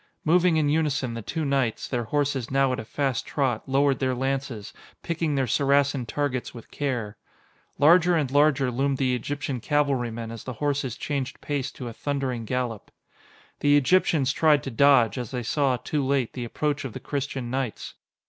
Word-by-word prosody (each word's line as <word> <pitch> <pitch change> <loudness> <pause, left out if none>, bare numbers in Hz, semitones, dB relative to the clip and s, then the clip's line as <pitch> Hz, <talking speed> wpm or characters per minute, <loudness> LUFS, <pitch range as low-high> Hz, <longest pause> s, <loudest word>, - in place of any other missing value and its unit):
Moving 175 +1 +4
in 155 -2 +2
unison, 145 -5 0
the 115 - -5
two 160 +8 -3
knights, 135 -5 0
their 120 -3 -2
horses 140 -1 -1
now 135 -1 +2
at - - -3
a 110 - -6
fast 135 0 -1
trot, 130 -4 -2
lowered 135 0 +2
their 130 -1 0
lances, 135 -5 -3 0.3
picking 165 -3 -1
their 135 -1 +1
Saracen 140 0 +2
targets 130 -2 -2
with 115 - -11
care. 120 -8 -3 0.6
Larger 170 +4 +5
and 145 -5 0
larger 145 -2 +3
loomed 135 +2 0
the 130 -2 +1
Egyptian 140 +1 -3
cavalrymen 120 -5 -1
as 115 -2 -8
the 130 - -5
horses 140 -1 -2
changed 140 -4 -3
pace 145 -3 -3
to 125 - -7
a 115 - -6
thundering 130 -4 -3
gallop. 120 -3 -3 0.7
The 145 0 +4
Egyptians 145 -2 +3
tried 150 -2 +3
to 135 - -5
dodge, 125 -3 +4
as 125 - -5
they 125 -2 -4
saw, 135 +1 +1
too 145 +5 -2
late, 135 -3 0
the 125 -2 -4
approach 145 +4 -2
of 130 -5 -6
the - - -6
Christian 135 -4 -4
knights. 130 -4 -3
135 Hz, 175 wpm, -25 LUFS, 125-145 Hz, 0.7 s, Larger